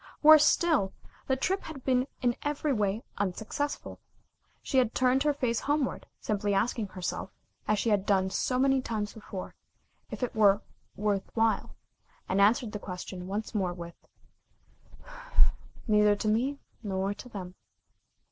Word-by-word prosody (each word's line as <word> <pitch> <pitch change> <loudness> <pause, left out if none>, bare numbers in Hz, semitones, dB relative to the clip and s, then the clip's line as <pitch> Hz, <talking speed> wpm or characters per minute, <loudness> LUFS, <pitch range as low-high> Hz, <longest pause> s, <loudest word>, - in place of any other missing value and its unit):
Worse 310 0 +9
still, 310 - +2 0.3
the 265 - +2
trip 375 +9 0
had 290 -5 -8
been 255 0 +2 0.2
in 240 -1 +2
every 295 0 -1
way 210 -1 0 0.2
unsuccessful. 220 +9 -3 0.6
She 265 - +2
had 245 -3 +1
turned 255 +1 +3
her 300 +1 +3
face 250 -5 0
homeward, 290 -2 -1
simply 205 -1 -1
asking 220 +1 0
herself, 185 0 -4 0.4
as 215 0 +2
she 230 - 0
had 200 -2 +3
done 190 -2 +2
so 250 +5 0
many 270 0 +3
times 215 -4 -3
before, 205 -4 -7 0.6
if - - -5
it 245 - -1
were 205 -1 +5 0.3
"worth 205 -2 -1
while," 225 -1 +1 0.5
and 195 +2 +2
answered 215 +3 +4
the 210 - -5
question 180 -1 -7
once 205 +3 -4
more 190 -4 0
with: 170 -1 -8 1.9
"Neither 210 -1 +5
to 205 - -3
me 250 +7 +1 0.2
nor 195 -2 -1
to 250 - -11
them." 185 -5 -7
215 Hz, 145 wpm, -29 LUFS, 200-260 Hz, 1.9 s, Worse